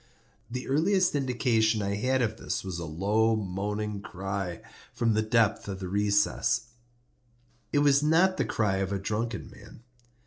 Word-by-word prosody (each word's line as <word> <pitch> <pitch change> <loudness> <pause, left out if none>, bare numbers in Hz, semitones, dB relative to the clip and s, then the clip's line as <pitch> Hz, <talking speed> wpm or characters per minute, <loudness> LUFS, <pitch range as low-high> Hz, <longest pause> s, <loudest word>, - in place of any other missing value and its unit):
The 125 +1 -5
earliest 180 +7 +2
indication 120 -5 +1
I 100 0 -1
had 125 +5 +1
of 110 -1 -2
this - - -3
was 95 -3 -5
a 85 - -4
low 105 +8 +1
moaning 105 +1 -3
cry 95 -2 -4 0.3
from 120 -2 +1
the 110 - +2
depth 110 -1 +1
of 95 -1 -5
the 95 - -5
recess. 105 +3 +1 1.0
It 145 - +3
was 140 0 +5
not 175 +5 +3
the - - +1
cry 105 -4 0
of 95 0 -2
a 100 - 0
drunken 110 +4 -3
man. 115 - -15
110 Hz, 160 wpm, -28 LUFS, 100-125 Hz, 1.0 s, was